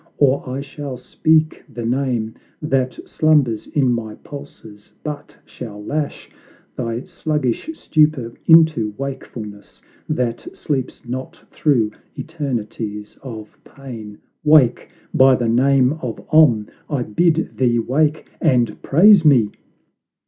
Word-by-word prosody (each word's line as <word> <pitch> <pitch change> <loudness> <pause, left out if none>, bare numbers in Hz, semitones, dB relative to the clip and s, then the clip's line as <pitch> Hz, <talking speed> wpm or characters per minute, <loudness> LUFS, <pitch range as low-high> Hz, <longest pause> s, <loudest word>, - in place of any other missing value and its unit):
or 140 -2 +2
I 130 +2 -3
shall 140 -2 -7
speak 155 +5 +1
the 120 -1 -5
name 120 -3 -1 0.3
That 135 -4 -1
slumbers 145 -8 +2
in 130 -4 +1
my 110 -2 -4
pulses, 125 -8 -12
but 150 -1 -7
shall 105 -4 -9
lash 150 +2 -3 0.5
Thy 120 0 -3
sluggish 150 - -2
stupor 150 - +1
into 160 -11 +5
wakefulness, 115 -6 -7 0.3
That 120 -2 -3
sleeps 135 -5 -3
not 130 +2 -6
through 120 -8 +1 0.3
eternities 115 -8 -5
of 110 -5 -9
pain! 115 -7 -10 0.3
Wake, 150 -5 +4 0.2
by 130 0 +6
the 120 -2 -1
name 130 +2 +3
of 120 -3 -4
OM, 130 -10 +5 0.2
I 140 -5 -1
bid 165 +9 +1
thee 120 -2 +2
wake, 150 +6 0
And 125 -7 +1
praise 190 +5 +6
me!" 125 -9 +4
130 Hz, 115 wpm, -20 LUFS, 115-150 Hz, 0.5 s, by